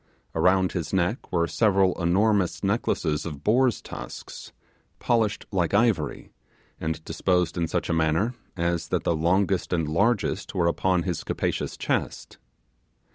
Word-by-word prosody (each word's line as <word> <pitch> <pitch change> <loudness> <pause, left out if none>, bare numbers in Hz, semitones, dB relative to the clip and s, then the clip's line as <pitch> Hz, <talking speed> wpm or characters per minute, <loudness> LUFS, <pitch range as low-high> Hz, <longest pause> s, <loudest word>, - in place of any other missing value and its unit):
Around 95 0 +3
his 85 -4 -3
neck 95 +5 -1
were 85 -2 +2
several 95 +1 +2
enormous 95 +2 +2
necklaces 95 -7 0
of 75 -4 -7
boar's 125 +1 +2
tusks, - - -9 0.5
polished 115 -3 0
like 90 -1 +1
ivory, 100 -10 +1 0.5
and 80 0 -3
disposed 90 +1 0
in 85 -1 0
such 85 +2 -2
a - - 0
manner 80 +8 +1 0.2
as 85 -1 -1
that - - -1
the 85 - +1
longest 90 +4 +1
and 85 -4 0
largest 100 +8 0
were 85 - +2
upon 90 +1 +1
his 90 -3 -3
capacious - - -2
chest. - - -3
90 Hz, 135 wpm, -25 LUFS, 85-100 Hz, 0.5 s, Around